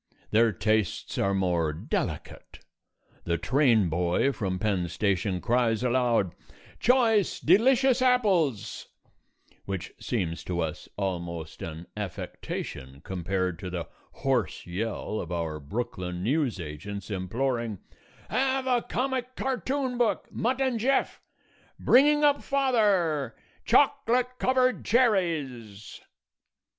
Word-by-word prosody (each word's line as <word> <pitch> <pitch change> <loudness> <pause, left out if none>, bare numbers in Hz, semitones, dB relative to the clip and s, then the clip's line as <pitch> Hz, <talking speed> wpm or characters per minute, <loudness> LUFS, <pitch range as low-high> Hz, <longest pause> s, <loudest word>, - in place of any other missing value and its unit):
Their 115 +1 +4
tastes 110 0 -1
are 100 0 +1
more 90 -4 +1
delicate. 75 - -4 0.7
The 85 0 0
train 115 - +3
boy 85 - +1
from 95 -7 -2
Penn 95 -3 0
Station 95 0 0
cries 120 +1 +1
aloud 120 -7 +2 0.5
"Choice, 230 -5 +3
delicious 255 - +4
apples," 195 - +1 0.8
which 95 -2 -4
seems 90 -8 -2
to 90 -1 -2
us 80 -2 -3
almost 85 -4 -4
an 80 +1 -6
affectation 70 -8 -6
compared 95 -1 -2
to 95 - -5
the 85 -2 -5 0.4
hoarse 130 -7 0
yell 105 +3 -3
of 85 - -6
our 80 -3 -2
Brooklyn 90 +1 -4
news 130 -2 0
agents 95 +6 -7
imploring 115 +3 -2 0.5
"Have 265 0 0
a 250 -2 +2
comic 255 +1 -2
cartoon 260 +1 -2
book, 235 -3 +1
'Mutt 255 +3 -1
and 260 -4 +1
Jeff,' 265 +4 +1 0.6
'Bringing 295 +4 +5
Up 290 -1 +4
Father,' 205 - +1 0.3
choclut 255 -3 +3
covered 255 0 +2
cherries!" 150 - 0
115 Hz, 110 wpm, -27 LUFS, -, 0.8 s, Bringing